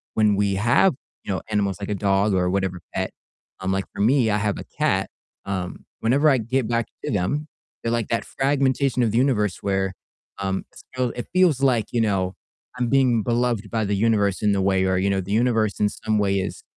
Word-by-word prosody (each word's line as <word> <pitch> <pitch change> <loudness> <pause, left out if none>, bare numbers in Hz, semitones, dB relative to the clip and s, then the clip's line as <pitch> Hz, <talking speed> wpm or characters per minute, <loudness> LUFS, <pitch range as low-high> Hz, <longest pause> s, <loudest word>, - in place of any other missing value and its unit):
when 105 -2 +3
we 100 -1 +1
have, 120 - +4 0.3
you - - -4
know, 95 - -3
animals 100 -2 0
like 100 - -5
a 105 - 0
dog 100 +1 +2
or 90 -1 +2
whatever 95 -1 -1 0.2
pet, - - -1 0.5
um, 95 0 -2
like 95 0 -1
for - - -4
me, 120 0 +3
I 105 - +2
have 105 -1 -1
a - - -6 0.2
cat, - - +1 0.4
um, 95 -2 -4 0.2
whenever 140 +7 +3
I 135 - +4
get 120 +2 -1
back 115 -1 0 0.2
to - - -2
them, 105 +11 -1 0.4
they're 115 - -1
like 115 -2 0
that 115 - -1
fragmentation 135 -2 +1
of 110 - +1
the 115 - 0
universe 110 -7 +1
where, 95 -1 0 0.5
um, 95 -1 -2
it's - - -15
feel 125 -2 0
it 120 - -5
feels 175 -8 +3
like, 125 -5 +3
you 120 - +1
know, 95 -4 0 0.5
I'm 125 - +1
being 130 -5 +3
beloved 120 -3 0
by 110 0 -1
the 100 0 0
universe 100 -2 +1
in 105 -1 +3
the 95 - +1
way, 95 -1 +2
or, 95 -1 +1
you 95 +2 +1
know, 95 -1 +1
the 95 +2 -7
universe 110 -2 +1
in 105 - +3
some 110 +1 -2
way 100 -1 +1
is 95 - -5
105 Hz, 220 wpm, -23 LUFS, 100-120 Hz, 0.5 s, have